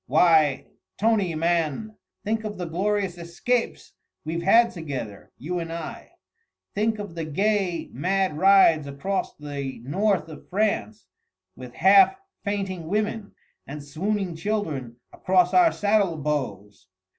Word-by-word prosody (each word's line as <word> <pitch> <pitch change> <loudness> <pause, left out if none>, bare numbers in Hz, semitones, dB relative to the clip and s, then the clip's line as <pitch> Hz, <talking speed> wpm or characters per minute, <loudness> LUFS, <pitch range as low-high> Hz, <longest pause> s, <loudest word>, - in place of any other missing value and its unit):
Why, 155 -5 +4 0.3
Tony 205 -6 +1
man! 170 +5 -1 0.3
think 220 +1 -1
of 210 -1 -5
the 180 - -4
glorious 190 +1 -1
escapes 175 +9 -2 0.3
we've 165 +2 -3
had 230 +6 +5
together, 135 - -7
you 175 +5 -4
and 165 -1 -5
I! 165 -1 -7 0.6
Think 220 +2 0
of 205 -4 -7
the 165 -1 -4
gay, 190 +2 0
mad 185 +4 0
rides 175 -4 +5
across 165 +8 -3
the 140 -3 -6
north 185 - 0
of 155 -2 -12
France, 215 +1 -1 0.5
with 125 -1 -11
half 195 - +6 0.3
fainting 195 -5 -3
women 210 +2 -2 0.3
and 145 +1 -7
swooning 185 +5 -2
children 160 - -3 0.2
across 180 -1 +2
our 350 -2 +6
saddle 205 -5 +1
bows! 120 -11 -4
180 Hz, 125 wpm, -24 LUFS, 155-205 Hz, 0.6 s, half